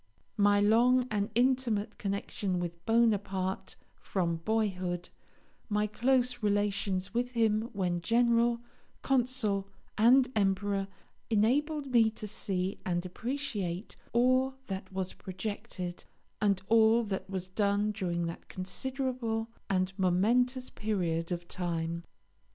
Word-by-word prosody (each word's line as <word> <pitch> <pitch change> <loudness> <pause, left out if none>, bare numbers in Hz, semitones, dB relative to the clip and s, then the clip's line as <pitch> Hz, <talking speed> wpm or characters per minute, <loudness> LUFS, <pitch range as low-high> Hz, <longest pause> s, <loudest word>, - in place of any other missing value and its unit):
My 205 0 +5
long 240 +5 +4
and 205 -1 0
intimate 240 -4 +1
connection 200 -2 -2
with 170 -1 -5
Bonaparte 205 -5 +1 0.2
from 170 -4 -2
boyhood, 180 -2 -1 0.6
my 210 0 +2
close 250 +3 +1
relations 200 -2 0
with 245 +1 -1
him 225 -1 +2
when 180 -3 -1
General, 235 +2 +3 0.4
Consul, 245 -7 +1 0.3
and 250 +4 +6
Emperor, 195 -1 +1 0.4
enabled 280 +8 +2
me 230 -3 +5
to 215 -1 -8
see 190 -2 -3
and 175 -1 -1
appreciate 210 -4 -3 0.2
all 255 +2 +3
that 190 -2 -6
was 190 -1 -3
projected 190 -2 -6 0.4
and 200 -3 +2
all 225 +1 +5
that 195 -3 -4
was 185 -2 -4
done 205 +2 +1
during 175 -5 -2
that 165 - -6
considerable 230 +3 -3 0.2
and 185 -1 +1
momentous 240 +8 +2
period 175 -6 -1
of 175 0 -3
time. 170 -2 -2
205 Hz, 110 wpm, -31 LUFS, 185-235 Hz, 0.6 s, and